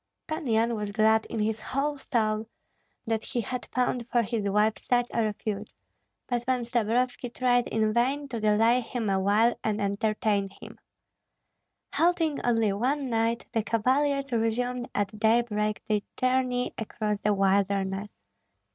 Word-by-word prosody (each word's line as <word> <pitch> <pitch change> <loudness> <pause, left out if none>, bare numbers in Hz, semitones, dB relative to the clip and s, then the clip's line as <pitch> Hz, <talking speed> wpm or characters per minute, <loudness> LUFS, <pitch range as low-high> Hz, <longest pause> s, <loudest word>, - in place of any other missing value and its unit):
Pan 310 -1 -4
Yan 230 +1 +2
was 210 -2 -3
glad 220 +1 +3
in - - -5
his 215 0 0
whole 285 +6 -1
soul 220 -4 0 0.6
that 225 -1 -1
he 245 -3 -2
had 250 +2 -5
found 250 -1 -1
for 240 -1 +2
his 215 -2 -2
wife 210 +2 +2
such 245 -1 +1
a 230 - +1
refuge; 210 -1 -3 0.5
but 240 -1 -1
Pan 255 0 0
Stabrovski 240 +1 0
tried 245 -1 +2
in 215 -1 +1
vain 270 +5 +1
to 235 - -3
delay 220 +3 +4
him 230 -3 -3
awhile 205 +5 +3
and 215 -1 0
entertain 205 0 0
him. - - -11 1.1
Halting 330 -3 +2
only 225 -4 +2
one 260 +5 -1
night, 230 +1 0
the 225 - +2
cavaliers 275 +5 +1
resumed 240 +2 -1
at 205 +1 -2
daybreak 215 -1 +1
their 210 -1 +1 0.2
journey 255 -1 +1
across 210 -2 -2
the 210 - +1
wilderness. 195 0 +1
225 Hz, 145 wpm, -27 LUFS, 210-250 Hz, 1.1 s, delay